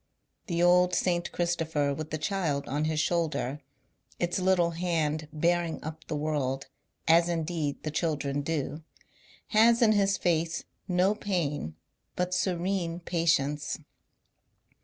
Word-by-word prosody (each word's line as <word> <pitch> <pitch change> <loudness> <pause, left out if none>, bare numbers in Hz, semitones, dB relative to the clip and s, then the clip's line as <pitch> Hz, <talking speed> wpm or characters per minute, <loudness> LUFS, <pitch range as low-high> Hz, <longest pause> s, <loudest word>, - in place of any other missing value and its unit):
The 170 -2 0
old 180 0 +5
St. 175 -1 0
Christopher 160 -4 0
with 155 +2 -5
the 155 - -2
Child 155 -4 -1
on 145 +5 -1
his 155 -1 0
shoulder 150 -4 0 0.3
— - - -33
its 175 +1 0
little 180 -2 +3
hand 160 -3 -1
bearing 170 +1 +1
up 155 +1 -7
the - - -2
world, 145 -3 -1 0.4
as 170 +1 +5
indeed 160 -3 -2
the 155 - -2
children 145 -3 -1
do 150 0 -3 0.3
— - - -31 0.3
has 230 +2 +5
in 230 -3 +5
his 200 -2 +3
face 165 -1 0 0.2
no 185 +2 +3
pain 160 - -2 0.4
but 180 0 -1
serene 175 -2 -1
patience. 160 -4 0
165 Hz, 135 wpm, -29 LUFS, 150-180 Hz, 0.4 s, old